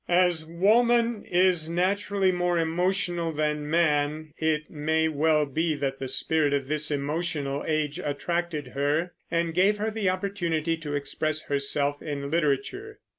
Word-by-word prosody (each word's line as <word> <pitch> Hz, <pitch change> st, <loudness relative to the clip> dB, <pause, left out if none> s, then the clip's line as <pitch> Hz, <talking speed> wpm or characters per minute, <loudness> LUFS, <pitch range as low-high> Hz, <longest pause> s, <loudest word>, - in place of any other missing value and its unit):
As 175 Hz, -2 st, +3 dB
woman 230 Hz, +6 st, +3 dB
is 175 Hz, -3 st, +2 dB
naturally 190 Hz, +2 st, +1 dB
more 175 Hz, -1 st, 0 dB
emotional 175 Hz, 0 st, 0 dB
than 150 Hz, -1 st, -1 dB
man, 155 Hz, -2 st, +1 dB
it 155 Hz, -1 st, 0 dB
may 160 Hz, +1 st, 0 dB
well 155 Hz, 0 st, +2 dB
be 155 Hz, +3 st, -1 dB
that 135 Hz, -2 st, -3 dB
the 135 Hz, -, -3 dB
spirit 150 Hz, +2 st, +1 dB
of 140 Hz, -2 st, -1 dB
this 150 Hz, +1 st, -1 dB
emotional 145 Hz, -1 st, -2 dB
age 155 Hz, 0 st, -1 dB
attracted 155 Hz, -1 st, -2 dB
her, 145 Hz, +6 st, 0 dB, 0.2 s
and 170 Hz, 0 st, 0 dB
gave 195 Hz, +4 st, +3 dB
her 215 Hz, +1 st, -1 dB
the 210 Hz, -3 st, 0 dB
opportunity 175 Hz, -4 st, -1 dB
to 150 Hz, -3 st, -5 dB
express 155 Hz, +2 st, -2 dB
herself 145 Hz, 0 st, -1 dB
in 140 Hz, -1 st, -4 dB
literature. 205 Hz, -, -1 dB
160 Hz, 140 wpm, -26 LUFS, 150-180 Hz, 0.2 s, As